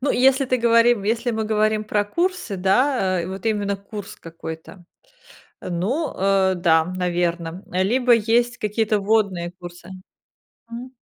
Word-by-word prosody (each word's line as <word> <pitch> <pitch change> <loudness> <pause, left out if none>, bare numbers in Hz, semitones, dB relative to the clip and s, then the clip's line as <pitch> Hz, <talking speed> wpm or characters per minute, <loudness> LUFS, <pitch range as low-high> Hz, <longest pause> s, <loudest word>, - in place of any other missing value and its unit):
Ну 275 - 0
и - - 0
если 270 +2 +4
ты 255 0 +1
говори 230 0 +4 0.2
если 230 +2 0
мы 220 -1 -2
говорим 215 0 +1
про 210 -1 0
курсы, 345 - -2
да, 190 -1 +1
э, 170 - -4
вот 190 +3 -6
именно 205 -2 0
курс 200 +1 -9
какой-то, 165 +2 -10 0.8
ну, 205 - -2
э, 195 -1 +2
да, 165 -3 +3
наверно, 175 -1 -2
либо 240 +7 +2
есть 235 +2 +2
какие-то 215 0 0
вводные 195 -4 0
курсы. 175 0 -12 0.8
Мгм. 245 +3 -9
205 Hz, 140 wpm, -22 LUFS, 180-235 Hz, 0.8 s, если